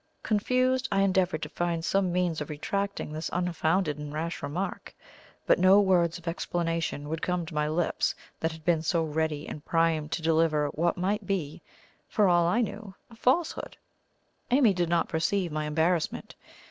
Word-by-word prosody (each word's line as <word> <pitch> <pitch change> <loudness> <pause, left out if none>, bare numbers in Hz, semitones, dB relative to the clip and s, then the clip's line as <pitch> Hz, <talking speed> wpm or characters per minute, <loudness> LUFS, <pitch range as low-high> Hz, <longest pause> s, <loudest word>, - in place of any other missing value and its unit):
Confused, 255 +4 +1
I 195 -1 +3
endeavoured 185 -4 +1
to - - -4
find 170 -1 -2
some 195 -1 +1
means 175 -3 0
of 150 - -5
retracting 195 +3 -3
this 155 +1 -4
unfounded 170 -2 0
and 150 -1 -6
rash 165 +3 -4
remark, 165 +7 -4 0.5
but - - +4
no 190 +2 +7
words 180 -4 +3
of 175 -1 -15
explanation 165 -3 -2
would 160 +2 -3
come 180 -1 -1
to 165 - -9
my 150 0 0
lips 165 +2 0 0.2
that 160 - 0
had 160 0 -12
been 170 -3 +3
so 165 +1 +1
ready 155 -1 -2
and 150 - -7
primed 165 -3 +1
to 165 - -3
deliver 160 -2 +2
what 170 +5 0
might 195 +3 -1
be, 175 -8 -2 0.5
for 210 -3 +2
all 175 -1 +4
I 225 +8 +2
knew, 205 -3 -5 0.2
a - - -13
falsehood. 270 +9 0 0.7
Amy 245 -4 +5
did 175 -2 0
not 170 -1 +2
perceive 175 +2 0
my 155 0 -2
embarrassment. 160 +2 0
170 Hz, 170 wpm, -28 LUFS, 160-195 Hz, 0.7 s, no